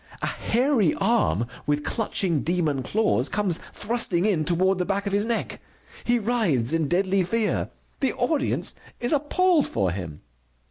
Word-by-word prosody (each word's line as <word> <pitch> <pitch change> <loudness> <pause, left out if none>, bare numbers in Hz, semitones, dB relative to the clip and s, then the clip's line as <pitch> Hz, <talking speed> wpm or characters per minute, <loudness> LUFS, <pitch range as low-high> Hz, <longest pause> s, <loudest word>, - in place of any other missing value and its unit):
A - - +2
hairy 240 - +1
arm 120 - +1 0.2
with 150 0 0
clutching 190 - 0
demon 160 -6 0
claws 215 +10 +1
comes 200 -5 0
thrusting 205 -5 0
in 175 -8 +1
toward 185 +3 +2
the - - +2
back 200 +1 -1
of 200 - -2
his 205 +2 +1
neck. 235 - -2 0.4
He 240 0 +3
writhes 200 - +1
in 165 -2 +1
deadly 190 +4 +2
fear. 215 +4 0 0.3
The 265 - +1
audience 280 +3 0 0.3
is 240 +5 0
appalled 310 +3 +2
for 95 -5 0
him. 85 -5 -6
195 Hz, 150 wpm, -25 LUFS, 165-235 Hz, 0.4 s, He